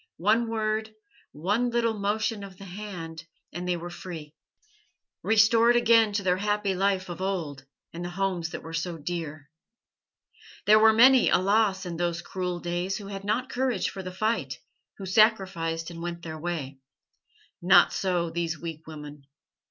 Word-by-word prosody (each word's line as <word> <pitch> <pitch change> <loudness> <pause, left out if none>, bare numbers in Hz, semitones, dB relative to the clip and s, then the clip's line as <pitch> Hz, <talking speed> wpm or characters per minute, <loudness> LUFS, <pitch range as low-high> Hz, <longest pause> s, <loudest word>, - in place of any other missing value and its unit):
One 220 +6 +2
word, 220 -1 -2 0.4
one 205 +11 0
little 235 -1 +1
motion 210 +1 -1
of 195 -2 -10
the 195 - -11
hand, 175 -4 -8 0.3
and 175 +1 -5
they 180 -1 0
were 175 +1 -7
free, 165 -4 -8 0.9
restored 225 +2 +4
again 230 -2 +5
to 200 0 -1
their 180 -1 +2
happy 205 0 0
life 190 0 0
of 175 0 -7
old 160 -8 -3 0.3
and 170 +1 -6
the 175 - -4
homes 180 -2 -2
that - - -7
were 160 - -9
so 165 +1 -3
dear. 155 -2 -6 1.1
There 215 +1 +7
were 220 0 +7
many, 255 +3 +6
alas! 195 0 +2
in 170 -2 -5
those 170 0 -2
cruel 180 -1 -3
days 175 +2 -2
who 200 -2 -8
had 195 -1 -6
not 225 +5 -1
courage 255 0 0
for 195 - -7
the 185 -1 -6
fight, 185 - -1 0.4
who 195 - -7
sacrificed, 185 -5 +2
and 165 0 -8
went 170 0 -5
their 160 -1 -6
way. 155 -5 -4 0.8
Not 175 0 +6
so 175 -3 -1
these 170 -1 -2
weak 165 -2 -7
women. 150 -3 -10
185 Hz, 160 wpm, -27 LUFS, 170-210 Hz, 1.1 s, There